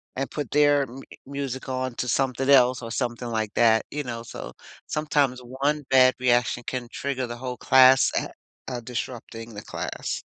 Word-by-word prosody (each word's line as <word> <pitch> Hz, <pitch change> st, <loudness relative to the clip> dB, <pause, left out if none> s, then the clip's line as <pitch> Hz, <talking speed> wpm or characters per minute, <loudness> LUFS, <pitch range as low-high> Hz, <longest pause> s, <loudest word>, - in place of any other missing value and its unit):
and 135 Hz, +1 st, -2 dB
put 145 Hz, -4 st, -5 dB
their 145 Hz, -1 st, +4 dB
m 135 Hz, +1 st, -9 dB, 0.2 s
music 140 Hz, -2 st, -5 dB
on 130 Hz, -1 st, -3 dB
to 125 Hz, -, -3 dB
something 135 Hz, +1 st, 0 dB
else, 125 Hz, -2 st, +5 dB
or 115 Hz, -, -6 dB
something 120 Hz, -1 st, -3 dB
like 110 Hz, -2 st, -2 dB
that, 110 Hz, -1 st, +4 dB
you 150 Hz, 0 st, -4 dB
know? 115 Hz, -3 st, -5 dB
So, 115 Hz, -, -8 dB, 0.3 s
sometimes 145 Hz, -4 st, 0 dB
one 140 Hz, +4 st, -2 dB
bad 130 Hz, -1 st, +6 dB
reaction 120 Hz, -1 st, +2 dB
can 125 Hz, -2 st, -3 dB
trigger 135 Hz, -2 st, -3 dB
the 120 Hz, 0 st, -7 dB
whole 125 Hz, 0 st, -5 dB
class, 130 Hz, 0 st, +6 dB
a -, -, -1 dB, 0.4 s
uh, 125 Hz, -2 st, -3 dB
disrupting 115 Hz, -1 st, -6 dB
the 105 Hz, -, -7 dB
class. -, -, -4 dB
130 Hz, 175 wpm, -25 LUFS, 120-135 Hz, 0.4 s, bad